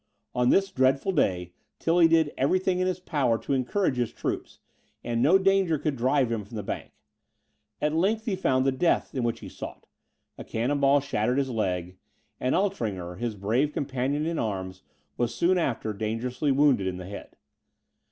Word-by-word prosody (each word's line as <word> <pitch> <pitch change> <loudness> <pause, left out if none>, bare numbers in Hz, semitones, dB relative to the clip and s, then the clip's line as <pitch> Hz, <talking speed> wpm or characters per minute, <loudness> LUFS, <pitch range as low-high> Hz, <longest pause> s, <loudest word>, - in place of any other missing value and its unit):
On 125 0 +2
this 195 0 +3
dreadful 130 +7 +2
day, 90 - 0 0.2
Tilly 165 0 +4
did 160 -2 +3
every 140 +8 +2
thing 185 -1 0
in 185 - +1
his 185 -1 -1
power 140 -10 +1
to 140 - -3
encourage 135 +3 0
his 120 -2 0
troops; - - -4 0.5
and 120 -1 -1
no 160 +9 +6
danger 195 -4 +2
could 150 0 -2
drive 130 0 +2
him 110 -2 -2
from 100 +4 -12
the 105 - -4
bank. - - -5 0.9
At 150 0 0
length 210 +7 +1
he 210 -5 0
found 130 -8 +1
the 135 - +3
death 165 +6 +1
which 120 -3 -1
he - - -8
sought, - - -9 0.5
a - - -5
cannon 125 +6 -1
ball 140 +1 +4
shattered 125 -2 0
his 135 -2 0
leg; 90 -5 -2 0.4
and 130 - +1
Altringer, 100 - -2
his 120 -3 -2
brave 115 +9 0
companion 140 +2 -1
in 165 0 -1
arms, 95 -3 -3 0.4
was, 120 -1 -1
soon 180 +1 +3
after, 115 -8 -1
dangerously 115 +7 -2
wounded 135 -8 +3
in 90 -1 -3
the 90 - -7
head. 100 +2 -9
130 Hz, 180 wpm, -27 LUFS, 115-160 Hz, 0.9 s, no